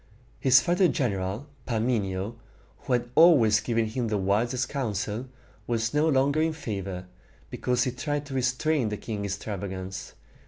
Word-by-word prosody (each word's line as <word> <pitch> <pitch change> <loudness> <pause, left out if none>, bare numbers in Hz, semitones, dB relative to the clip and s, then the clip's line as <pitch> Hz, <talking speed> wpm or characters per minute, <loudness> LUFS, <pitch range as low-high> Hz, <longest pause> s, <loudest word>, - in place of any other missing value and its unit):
His 130 -1 +6
father's 180 +1 +3
general, 100 - -1 0.2
Parmenio, 110 -3 -1 0.4
who 130 - -2
had 120 0 0
always 125 -11 +6
given 115 -1 0
him 115 +2 -2
the 105 -1 0
wisest 115 +6 +1
counsel, 110 -2 -3 0.4
was 115 -1 0
no 150 +2 +3
longer 140 +2 +3
in 160 0 +1
favor, 95 - -5 0.5
because 125 -1 0
he 130 - -1
tried 145 +3 -3
to 140 - -8
restrain 130 0 +1
the 105 - -3
king's 100 -3 -3
extravagance. 95 -2 -6
120 Hz, 145 wpm, -27 LUFS, 105-135 Hz, 0.5 s, His